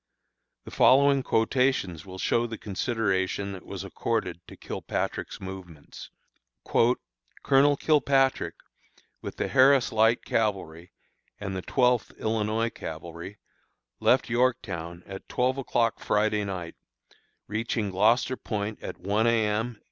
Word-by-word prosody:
The - - -11
following 140 +1 +5
quotations 115 - 0
will 95 0 -8
show 120 +5 +1
the 115 -1 -6
consideration 100 -2 -1
that 95 -2 -9
was - - -6
accorded - - -2
to - - -12
Kilpatrick's - - -4
movements: 95 -5 -10 1.3
"Colonel 140 +1 +4
Kilpatrick, 135 - +2 0.7
with - - -7
the - - -1
Harris 135 -1 +5
Light 110 +1 +3
Cavalry 90 -6 -2 0.5
and 95 -2 -4
the 95 - -3
Twelfth 125 +2 +1
Illinois 110 +1 0
Cavalry, 85 +5 -8 0.6
left 125 +1 +3
Yorktown 105 -9 -1
at 95 0 -9
twelve 130 +2 0
o'clock 115 -3 0
Friday 105 0 +1
night, 90 -4 -5 0.7
reaching 110 -1 -2
Gloucester 115 +7 +2
Point 105 -1 -4
at - - -6
one 100 +5 +1
A. 115 -2 +3
M. 110 +2 -2
110 Hz, 120 wpm, -27 LUFS, 95-125 Hz, 1.3 s, following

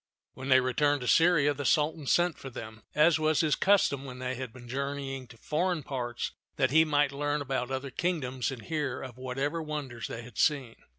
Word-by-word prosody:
When 130 +2 -7
they 130 0 +7
returned 145 +3 +1
to 125 - -4
Syria, 165 -3 +5
the 145 +1 -5
Sultan 150 0 +1
sent 175 +1 +2
for 135 - -7
them, 110 -2 -9
as 160 +2 +5
was 155 -1 +3
his 155 -3 +2
custom 190 -9 +3
when 130 -2 -8
they 130 0 -3
had 130 -2 -5
been 120 0 -12
journeying 135 0 -4
to 115 -1 -15
foreign 165 +5 -1
parts, 120 -3 -3 0.2
that - - +2
he 160 +2 +6
might 145 -3 +2
learn 145 +1 -1
about 130 -3 -2
other 135 0 -3
kingdoms 130 -6 -1
and 130 -5 -7
hear 150 -6 -2
of 130 -1 -9
whatever 135 +6 -2
wonders 150 -6 -5
they 115 - -6
had 120 +1 -10
seen. 135 -7 +2
140 Hz, 200 wpm, -29 LUFS, 130-150 Hz, 0.2 s, they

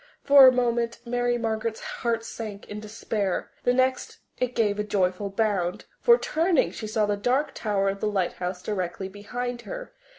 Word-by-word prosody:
For 280 -2 +9
a - - +8
moment 235 -2 0
Mary 245 0 0
Margaret's 220 -1 -2 0.2
heart 230 -2 0
sank 215 -4 -7
in 210 - -6
despair; 210 -2 -3
the 245 - +5
next 255 0 0 0.2
it 250 -1 -1
gave 210 -3 +1
a - - +1
joyful 200 -1 0
bound, 195 -4 -1
for, 475 -1 +6
turning, 330 - +1
she 220 - -6
saw 215 0 +1
the 205 0 0
dark 250 +8 0
tower 200 -3 0
of 195 0 -1
the 215 - 0
lighthouse 180 -2 -2
directly 190 -1 -3
behind 240 +5 -5
her. - - -8
220 Hz, 170 wpm, -26 LUFS, 200-245 Hz, 0.2 s, For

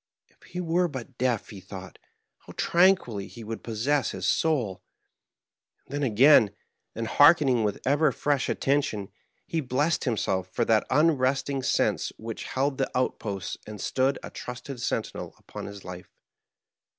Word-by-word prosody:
If - - -33
he 180 - -8
were 175 +1 +1
but 130 -4 -8
deaf, 125 -4 0
he 100 - -9
thought, 95 0 -10 0.4
how - - -13
tranquilly 170 - +3
he 115 - -11
would 110 +1 -6
possess 125 +6 0
his - - -3
soul 125 - +1
I - - -53
And - - -14
then 145 -4 0
again, 110 -3 +6 0.4
and 115 - -3
hearkening 145 -2 +5
with 105 -1 -1
ever 145 +3 +3
fresh 145 -2 0
attention, 135 -8 0 0.4
he 165 - -1
blessed 145 +5 0
himself 95 -6 -1
for 115 +5 0
that 110 -2 +2
unresting 140 -2 +2
sense 130 - +1
which 115 0 -6
held 135 +1 -1
the - - +1
out 130 - 0
posts 100 -4 -4
and 105 -1 -8
stood 135 +1 +1
a - - -7
trusted 125 +1 -7
sentinel - - -3
upon - - -8
his 100 -1 -10
life. 90 0 -8
130 Hz, 155 wpm, -27 LUFS, 105-145 Hz, 0.4 s, again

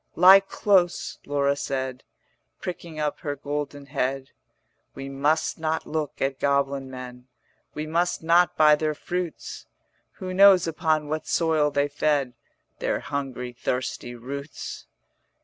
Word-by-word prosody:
'Lie 185 +3 +9
close,' 195 -2 +1
Laura 140 -1 +1
said, 130 -2 -3 0.5
40 - - -52
Pricking 170 -3 -6
up 150 -1 -1
her 145 -1 -3
golden 145 0 -4
head: 135 -1 -2 0.6
'We 135 0 -6
must 150 +5 0
not 160 0 -1
look 155 -2 -3
at 135 0 -1
goblin 140 -1 0
men, 125 -1 -9 0.5
We 150 +1 -3
must 170 +2 0
not 170 +1 +4
buy 155 -1 +7
their 155 0 -1
fruits: 175 0 -5 0.5
Who 185 0 -6
knows 195 -1 +7
upon 155 -2 0
what 155 +1 -3
soil 160 -3 +2
they 145 0 +1
fed 145 -3 0 0.5
Their - - 0
hungry 135 -3 -4
thirsty 125 0 -3
roots?' 140 +5 -7
145 Hz, 130 wpm, -25 LUFS, 135-160 Hz, 0.6 s, Lie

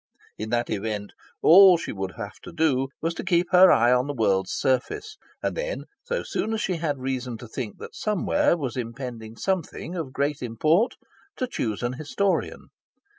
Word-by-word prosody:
In 110 +1 -5
that 120 +1 0
event, 105 -1 -3 0.3
all 185 +1 +9
she - - -5
would 95 -2 -4
have - - -7
to - - -10
do 135 -5 +1 0.2
was 165 +1 0
to - - -6
keep 175 0 +1
her 185 0 +8
eye 120 +2 +5
on 125 +2 +2
the 145 - -3
world's 95 -5 +1
surface, 135 - -1 0.3
and - - -1
then, - - -3 0.2
so - - -3
soon 225 - -2
as 215 - -2
she 185 -3 -1
had 155 -3 -1
reason 130 -2 -3
to 120 - -10
think 110 -2 -5
that - - -9
somewhere 215 +4 +1
was 135 -6 -4
impending 115 -2 -6
something 185 -2 -2
of 160 -7 -4
great 140 +2 -1
import, 155 - +2 0.4
to 255 - -1
choose 115 - -3
an 120 +1 -1
historian. 155 +8 -1
140 Hz, 180 wpm, -25 LUFS, 120-180 Hz, 0.4 s, all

